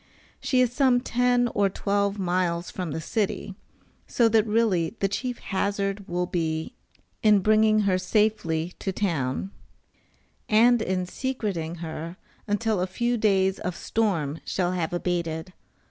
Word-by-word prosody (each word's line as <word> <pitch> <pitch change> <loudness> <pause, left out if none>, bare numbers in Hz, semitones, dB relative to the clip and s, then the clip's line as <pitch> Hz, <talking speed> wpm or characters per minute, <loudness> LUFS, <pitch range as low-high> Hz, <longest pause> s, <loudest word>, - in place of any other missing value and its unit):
She 255 -2 +2
is 245 -1 +2
some 255 -2 +4
ten 245 0 +2
or 205 -3 +1
twelve 200 +1 0
miles 175 -2 -1
from 180 -3 -4
the 155 +2 -3
city, 200 +3 -2 0.5
so 235 - +3
that 220 0 +3
really 210 -5 +1
the 195 - +2
chief 245 +5 -3
hazard 200 0 -2
will 175 +1 -1
be 160 +2 -2 0.5
in 210 -2 +5
bringing 215 +1 +4
her 190 -3 +2
safely 185 -4 0
to 195 - -2
town, 170 -4 -2 1.0
and 235 +2 +5
in 185 -3 -1
secreting 195 -8 -3
her 165 +2 -6 0.3
until 210 -1 0
a 185 - 0
few 240 +6 -1
days 195 -4 +2
of 180 -1 -3
storm 165 -11 -1
shall 180 -2 -1
have 175 -3 -2
abated. 175 -1 -2
195 Hz, 140 wpm, -26 LUFS, 175-220 Hz, 1.0 s, in